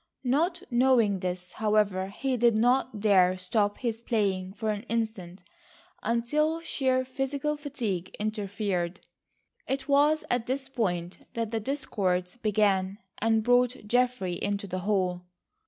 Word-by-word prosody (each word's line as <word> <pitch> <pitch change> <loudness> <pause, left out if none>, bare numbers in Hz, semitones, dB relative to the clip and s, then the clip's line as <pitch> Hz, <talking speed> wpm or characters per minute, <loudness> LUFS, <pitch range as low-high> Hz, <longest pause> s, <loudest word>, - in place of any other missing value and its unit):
Not 335 +8 +1
knowing 240 -5 +4
this, 180 0 -4
however, 210 -3 +1
he 260 +6 -2
did 235 -2 +4
not 245 0 +2
dare 185 -3 +4
stop 205 +3 0
his 230 -2 -3
playing 195 -5 0
for 215 +1 -1
an 205 -1 -3
instant, 220 -6 -3 0.6
until 300 +8 +1
sheer 260 -5 0
physical 275 +3 -2
fatigue 235 - -4
interfered. 200 -4 -2 0.7
It 265 0 -2
was 295 +2 +3
at 245 -1 0
this 265 +1 -2
point 180 -9 -2
that 230 -2 -2
the 225 - 0
discords 195 -8 -1
began, 205 -4 +1 0.2
and 225 0 +2
brought 245 0 +2
Geoffrey 245 -5 +1
into 205 0 -1
the 185 -1 -4
hall. 180 -2 -1
220 Hz, 130 wpm, -28 LUFS, 190-255 Hz, 0.7 s, knowing